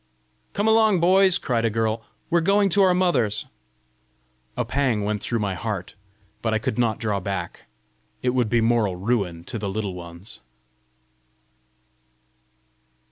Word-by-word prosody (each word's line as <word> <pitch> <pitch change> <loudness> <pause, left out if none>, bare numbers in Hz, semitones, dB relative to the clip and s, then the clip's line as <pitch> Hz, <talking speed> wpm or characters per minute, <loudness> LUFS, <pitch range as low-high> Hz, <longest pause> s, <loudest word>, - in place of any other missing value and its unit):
"Come 205 +2 0
along, 220 -3 +4
boys!" 185 +2 +4
cried 120 -3 -1
a 115 - +2
girl. 110 +1 -1 0.3
"We're 170 0 +4
going 200 +3 +3
to 200 +3 +3
our 185 -2 +5
mothers!" 140 - +1 1.1
A - - 0
pang 125 -7 0
went 105 0 -2
through 115 - -1
my 100 -3 -1
heart. 95 -1 -4 0.5
But 110 -1 0
I - - +4
could 110 +1 -3
not 115 -3 +1
draw 105 -4 -1
back; 95 -2 -5 0.6
it 125 - +2
would 125 -3 +1
be 120 0 +2
moral 115 -4 +2
ruin 95 -4 -1
to 115 - -6
the 100 -1 -3
Little 100 -1 -3
Ones! 85 +2 -10
115 Hz, 145 wpm, -24 LUFS, 100-165 Hz, 1.1 s, our